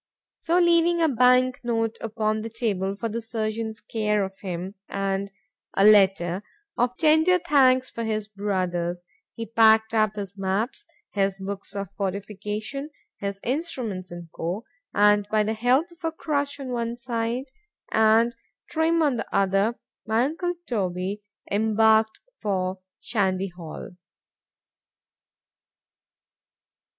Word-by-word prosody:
——So 335 +2 +1
leaving 345 -1 +4
a 325 - +4
bank 255 -1 +4
note 225 -1 -1
upon 215 -1 -1
the 225 - -5
table 200 -4 -1
for 230 +3 -3
the 230 +1 -3
surgeon's 220 0 -3
care 210 -2 0
of 190 0 -10
him, 185 -1 -5 0.2
and 195 0 -2 0.5
a 195 - +5
letter 195 -3 +5 0.3
of 245 +1 0
tender 315 +3 +5
thanks 260 -6 +4
for 230 - -4
his 215 -2 -1
brother's—he 185 0 -3
packed 220 0 +4
up 215 -2 +2
his 200 -2 -5
maps, 200 - -2 0.3
his 195 -1 +1
books 195 +1 -7
of 200 -2 -4
fortification, 210 +7 -4 0.3
his 200 -1 -4
instruments, 245 - -3
&c. 175 - -8 0.8
and 205 0 +4
by 215 0 +3
the 215 +1 -1
help 245 +7 +3
of 340 0 -20
a 325 - 0
crutch 285 -3 -2
on 270 -2 -6
one 235 -1 -2
side, 235 +1 -2 0.5
and 220 +2 +4 0.4
Trim 325 +1 +2
on 280 -5 +2
the - - -4
other,——my 210 +3 0
uncle 350 +5 -1
Toby 195 - -2 0.3
embarked 220 +1 +3 0.2
for 185 -2 -1 0.2
_Shandy 195 -3 0
Hall. 170 -2 -8
220 Hz, 120 wpm, -25 LUFS, 195-245 Hz, 0.8 s, a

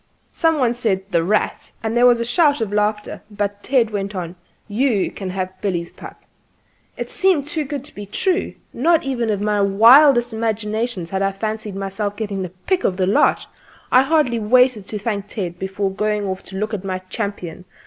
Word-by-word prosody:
Some 325 -2 +1
one 245 -4 +2
said 215 -6 -1
"The 170 -1 +2
Rat," 210 +5 -1
and 225 +1 -2
there 245 +1 +6
was 240 -1 +4
a 235 - -1
shout 290 +3 +3
of 215 -3 -3
laughter, 210 0 -1
but 205 -1 -3
Ted 240 -3 +2
went 200 0 -3
on; 175 -1 -5 0.3
"You 220 -1 +1
can 190 -2 -6
have 185 0 -5
Billy's 175 -4 -2
pup." - - -12 0.7
It - - -5
seemed 375 -7 +2
too 305 +1 -2
good 280 -1 -5
to 300 - -12
be 205 0 -8
true; 365 - -1 0.2
not 325 +6 +2
even 245 -4 -2
in 205 -1 -1
my 210 -1 +1
wildest 240 +5 +6
imaginings 220 -3 -2
had 190 0 -1
I 195 0 +1
fancied 215 0 -4
myself 195 +1 -3
getting 205 -2 -4
the 185 - -4
pick 270 - -2
of 180 - 0
the 185 - +1
lot. 195 - +2 0.5
I 255 - +7
hardly 270 -5 +2
waited 240 -1 +3
to 215 - -4
thank 205 -2 -3
Ted 180 -5 -5
before 195 +1 -2
going 210 +1 -1
off 190 -1 -3
to 190 - -8
look 215 +3 -3
at 200 -3 -3
my 190 -1 -2
champion. 195 -5 -5
210 Hz, 195 wpm, -20 LUFS, 195-245 Hz, 0.7 s, I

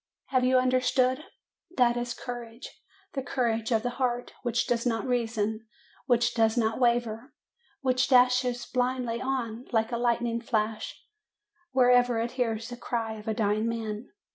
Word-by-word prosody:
"Have 255 -2 +2
you 255 +1 +4
understood? 255 +2 +2 0.5
That 240 -2 +4
is 240 0 -3
courage 240 -1 -8 0.3
the 270 - -2
courage 235 -3 -1
of 225 -1 +2
the 245 - -1
heart, 245 -1 -1
which 240 -1 0
does 240 -2 0
not 230 -1 0
reason, 225 -3 -1 0.4
which 240 -2 +3
does 225 0 +2
not 225 0 +1
waver, 240 0 0 0.5
which 255 -1 +2
dashes 250 -1 +3
blindly 250 -2 -1
on, 250 -3 -3
like 225 0 +1
a 235 - -1
light 235 0 +1
ning 235 0 -1
flash, 220 -2 -2 0.7
wherever 245 -2 +4
it 230 +1 -1
hears 230 -2 -2
the 245 - -7
cry 230 -2 -2
of 210 - -13
a 220 - 0
dying 215 +1 +1
man. 220 -1 -4
240 Hz, 155 wpm, -28 LUFS, 225-250 Hz, 0.7 s, you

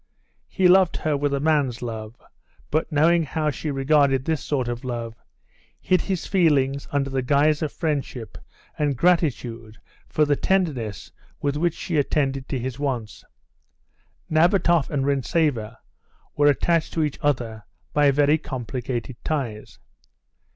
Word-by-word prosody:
He 190 -2 +2
loved 185 -1 +5
her 155 -2 0
with 145 0 0
a 140 - 0
man's 140 -6 +1
love, 110 -1 -6 0.5
but 155 +3 0
knowing 165 +3 +4
how 155 0 -1
she 150 +4 -5
regarded 135 -1 +2
this 160 -3 -1
sort 130 -4 -1
of 120 +1 -4
love, 120 -2 -4 0.7
hid 185 -2 +2
his 190 -4 -3
feelings 140 -7 +2
under 140 -1 0
the 135 -1 0
guise 145 +4 +2
of 155 - -1
friendship 140 -8 -3 0.4
and 145 -3 0
gratitude 120 -9 0 0.3
for 155 - +2
the 145 0 +2
tenderness 140 - -1 0.3
with 140 0 -1
which 170 +2 0
she 170 -4 -3
attended 135 -2 0
to 135 - -1
his 130 +1 -5
wants. 125 -7 -3 1.0
Nabatoff 170 -1 +3
and 140 -3 -1
Rintzeva 140 -5 0 0.6
were 145 0 +4
attached 160 +3 +2
to 160 - +1
each 150 -2 -3
other 120 -7 -1 0.3
by 145 -1 +4
very 145 +2 +3
complicated 125 -2 -5
ties. 120 -9 -4
140 Hz, 140 wpm, -23 LUFS, 125-155 Hz, 1.0 s, loved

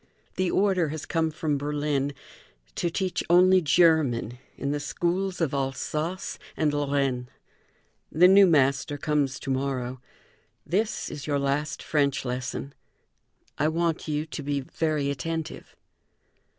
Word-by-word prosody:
The 185 -1 0
order 190 -4 +2
has 155 0 -5
come 165 -1 0
from 150 -2 -2
Berlin 145 -1 -1 0.6
to 175 - -1
teach 185 +1 -2
only 185 +2 +6
German 145 -8 +3 0.2
in 140 - -2
the 145 - -1
schools 180 +5 -1
of 160 -5 0
Alsace 150 +6 -3 0.2
and 150 -2 +1
Lorraine. 140 -4 0 0.8
The 175 +4 +6
new 195 +1 +7
master 145 -1 +2
comes 145 -2 0
to 135 - -3
morrow. 130 -2 -2 0.6
This 210 +5 -1
is 140 -4 -7
your 145 -1 +1
last 140 +2 -1
French 140 -3 +1
lesson. 130 +2 -4 0.9
I 150 - +3
want 165 0 -1
you 150 0 -1
to 155 - -6
be 140 0 -1
very 150 0 -1
attentive." 160 +3 -5
150 Hz, 130 wpm, -26 LUFS, 140-165 Hz, 0.9 s, new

